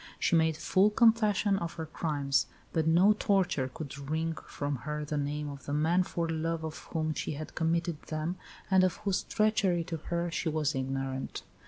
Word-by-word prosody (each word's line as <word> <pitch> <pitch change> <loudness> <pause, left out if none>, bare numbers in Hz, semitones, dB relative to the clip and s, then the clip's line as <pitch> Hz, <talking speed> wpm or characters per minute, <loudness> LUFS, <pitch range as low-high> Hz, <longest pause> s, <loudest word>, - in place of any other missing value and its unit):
She - - +2
made 160 -1 +3
full 190 +5 +3
confession 215 -3 +3
of 170 - -4
her 160 -1 -5
crimes; 145 -4 0 0.3
but 160 -1 +1
no 180 +6 +6
torture 190 -10 +1
could 140 0 -7
wring 160 +1 -1
from 145 -1 -3
her 150 +3 -4
the 150 - -3
name 145 +1 -2
of 140 -1 -8
the 145 - -2
man 165 +4 +3
for 170 -2 -2
love 165 0 -2
of 160 -1 -5
whom 155 -1 -1
she - - -3
had 155 +2 -7
committed 165 -1 0
them, 155 +3 -2 0.3
and 190 -1 +6
of 185 -2 +2
whose 195 -2 +1
treachery 200 -5 +1
to 165 -1 -4
her 170 +2 -2
she 170 0 -1
was 155 -1 0
ignorant. 135 0 -3
160 Hz, 185 wpm, -30 LUFS, 150-180 Hz, 0.3 s, no